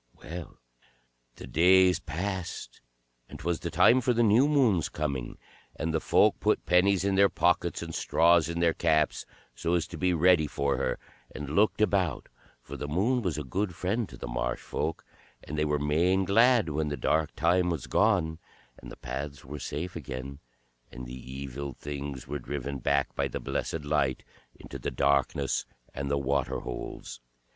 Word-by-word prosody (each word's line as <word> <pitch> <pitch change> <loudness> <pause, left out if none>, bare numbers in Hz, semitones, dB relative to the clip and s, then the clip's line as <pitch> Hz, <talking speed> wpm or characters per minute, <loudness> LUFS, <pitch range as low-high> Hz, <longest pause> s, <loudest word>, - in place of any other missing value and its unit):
Well, 85 +1 -9 0.8
the - - -9
days 90 0 +5
passed, 95 +3 -5 0.5
and - - -9
't - - -13
was 85 -1 0
the 85 - -4
time 95 +10 +5
for 125 +1 +2
the 120 0 +2
new 115 +6 +5
moon's 125 - +2
coming, 70 -5 -3 0.4
and 80 0 -2
the 80 - +2
folk - - +3
put - - +1
pennies 95 +2 +3
in 100 - +1
their 100 +1 +5
pockets 85 -1 +1
and 80 -1 -7
straws 85 0 +3
in 85 0 -2
their 85 -1 +3
caps 80 -3 +1 0.3
so 85 +8 -1
as 85 - 0
to - - -8
be 90 -1 +2
ready 85 -2 +4
for 70 -1 -1
her, - - -1 0.4
and 75 0 -5
looked 105 +1 +3
about, 95 -7 +1 0.3
for - - -8
the 75 - -5
Moon 105 - +1
was 90 -8 -2
a 75 - -3
good 90 +7 -2
friend 105 +6 -1
to - - -11
the - - -6
marsh - - -2
folk, 80 - -3 0.4
and 75 - -6
they 75 0 +1
were 75 0 +1
main 85 +6 +2
glad 115 -1 +4
when 75 +1 -1
the 75 -1 -3
dark 80 +4 0
time 90 +2 +2
was 80 -7 -3
gone, 90 -7 +1 0.4
and - - -10
the - - -10
paths 70 -1 -6
were 75 +3 -7
safe 85 +7 -5
again, 70 -2 -6 0.5
and 60 +1 -8
the - - -9 0.3
Evil 70 +1 -6
Things 70 -1 -6
were 75 +2 -4
driven 70 +1 -5
back 70 +2 0
by - - 0
the - - -5
blessed 75 +3 -3
Light 70 -3 0 0.3
into - - -9
the - - -3
darkness 70 -1 +1 0.3
and 70 +1 -4
the 70 - +1
waterholes. 65 -3 -3
80 Hz, 180 wpm, -28 LUFS, 70-90 Hz, 0.8 s, days